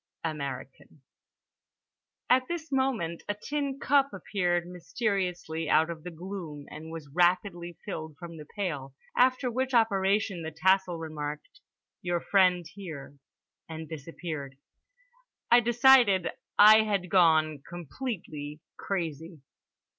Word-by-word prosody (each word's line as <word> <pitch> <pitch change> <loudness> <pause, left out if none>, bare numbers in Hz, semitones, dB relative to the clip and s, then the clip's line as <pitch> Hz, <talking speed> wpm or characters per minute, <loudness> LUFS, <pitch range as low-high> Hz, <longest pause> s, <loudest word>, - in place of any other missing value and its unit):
"American." 140 -2 -6 1.2
At 255 0 +3
this 330 -3 -5
moment 255 -12 0
a 205 - 0
tin 280 +5 -3
cup 280 0 +3
appeared 175 -3 -1
mysteriously 180 -3 -2
out 160 +2 +4
of 160 -2 -8
the 180 - -5
gloom 170 -4 -7
and 160 +1 -8
was 160 -2 -8
rapidly 175 0 +1
filled 160 -6 -6
from 170 +1 -9
the 150 -1 -10
pail, 145 -9 -3 0.2
after 255 0 +3
which 260 +1 -1
operation 200 -4 +2
the 160 - -4
tassel 185 +2 +2
remarked: 150 -2 -6 0.4
"Your 175 -1 -1
friend 180 -1 +3
here" 155 -8 -9 0.5
and 160 0 -7
disappeared. 155 -3 -7 0.9
I 240 - +8
decided 240 -5 +5 0.3
I 215 +1 +9
had 200 -4 -1
gone 155 -5 +4
completely 165 - -6 0.2
crazy. 165 -4 -4
175 Hz, 115 wpm, -28 LUFS, 160-205 Hz, 1.2 s, I